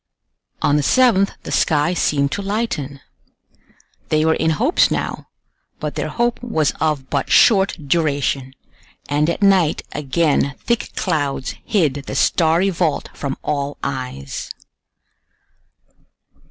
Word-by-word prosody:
On 145 - +3
the - - +2
7th 200 - +3
the - - -7
sky 150 +4 +2
seemed 140 -5 +1
to 205 - -2
lighten. 195 - -3 1.1
They 155 0 +2
were 160 - +4
in 160 - 0
hopes 250 - +3
now, - - -3 0.5
but - - -4
their - - -3
hope 240 0 -1
was 160 -12 0
of 150 -5 -1
but - - -1
short 200 -4 +5
duration, 140 -4 0 0.5
and 150 +2 +1
at 170 - -2
night 190 -6 +3
again 145 -1 0
thick 235 -1 -2
clouds 140 -4 -1
hid 170 - +2
the - - -4
starry 170 +3 +2
vault 165 -4 -1
from 140 -2 -4
all 145 -1 -2
eyes. 125 - -5
155 Hz, 125 wpm, -19 LUFS, 140-195 Hz, 1.1 s, short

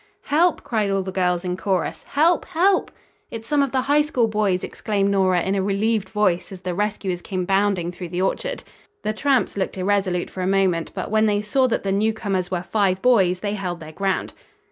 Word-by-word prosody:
"Help!" 330 +4 +2
cried 215 -4 0
all 195 -1 0
the 190 - -5
girls 180 -1 0
in 180 0 -1
chorus. 185 -2 -1
"Help! 325 +4 +3
Help!" 370 +4 +2 0.4
"It's 225 0 -8
some 295 +1 +2
of 275 -2 0
the 260 - +1
High 290 +3 +3
School 260 -6 +1
boys!" 210 -4 0
exclaimed 200 -3 -1
Nora, 185 -3 +2
in 190 - 0
a 195 - +1
relieved 205 +2 0
voice 205 -5 0
as 185 -2 -9
the 185 -1 -3
rescuers 195 -2 -2
came 185 -1 -3
bounding 195 -2 +1
through 180 -1 -8
the 180 +2 -1
orchard. - - -2 0.4
The 215 - -1
tramps 270 -1 +1
looked 190 0 -2
irresolute 185 -2 0
for 185 - -6
a 180 - 0
moment, 190 -4 +1
but - - -4
when 220 0 +3
they 205 0 +1
saw 255 +5 +2
that 235 - -1
the 195 - -1
newcomers 200 -3 0
were 180 -2 -2
five 190 0 +1
boys 190 -8 +3
they 205 -1 -2
held 180 -4 -4
their 155 -1 -9
ground. 195 +3 -2
195 Hz, 210 wpm, -22 LUFS, 185-220 Hz, 0.4 s, Help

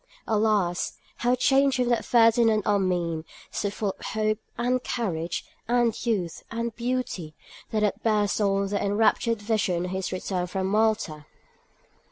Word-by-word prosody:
Alas! 210 -5 +1 0.2
how 245 +1 +2
changed 270 +1 +3
from 250 -2 +1
that 235 -2 +2
Ferdinand 225 -2 +4
Armine, 180 -5 +1 0.3
so 205 - -1
full 200 -1 -2
of - - -12
hope, 215 0 0 0.2
and 250 +1 0
courage, 170 -8 -2 0.2
and 240 -1 +1
youth, 185 -8 -1
and 230 0 -3
beauty, 235 -10 -3 0.3
that 215 -2 0
had 210 +1 0
burst 210 -2 +1
on 200 -1 +2
their 200 -1 -1
enraptured 220 +2 +2
vision 200 -5 0
on 180 - -5
his 190 0 -3
return 185 -1 -2
from 190 +1 -2
Malta. 200 -7 0
215 Hz, 145 wpm, -26 LUFS, 190-230 Hz, 0.3 s, Ferdinand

